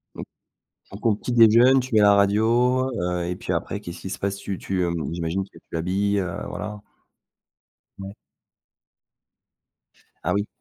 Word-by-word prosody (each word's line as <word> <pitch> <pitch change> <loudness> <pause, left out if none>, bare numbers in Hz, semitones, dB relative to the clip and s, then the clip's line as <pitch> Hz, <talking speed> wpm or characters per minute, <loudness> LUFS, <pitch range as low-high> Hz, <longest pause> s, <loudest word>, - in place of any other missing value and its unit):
Mmh - - -7 0.7
donc 100 - -11
on 105 - +3
petit 115 - -5
déjeune, 120 +3 +6
tu 130 -1 -5
mets 105 - +6
la 100 0 +6
radio, 115 +6 +2
heu 90 0 -2
et 90 - -3
puis - - -5
après 100 - -2
qu'est-ce 85 -4 -9
qui 95 - -6
se - - -5
passe? 100 0 -2
Tu 100 -1 -5
tu, 95 -1 -2
heu, 85 -1 0 0.2
j'imagine 85 +3 -2
que 95 - -16
tu - - -14
l'habilles, 100 +5 0
heu, 90 -3 -3
voilà? 105 -1 -6 1.2
Ouais. 100 0 -8 2.1
Ah 90 - +1
oui? 100 +2 0
100 Hz, 165 wpm, -23 LUFS, 90-110 Hz, 2.1 s, déjeune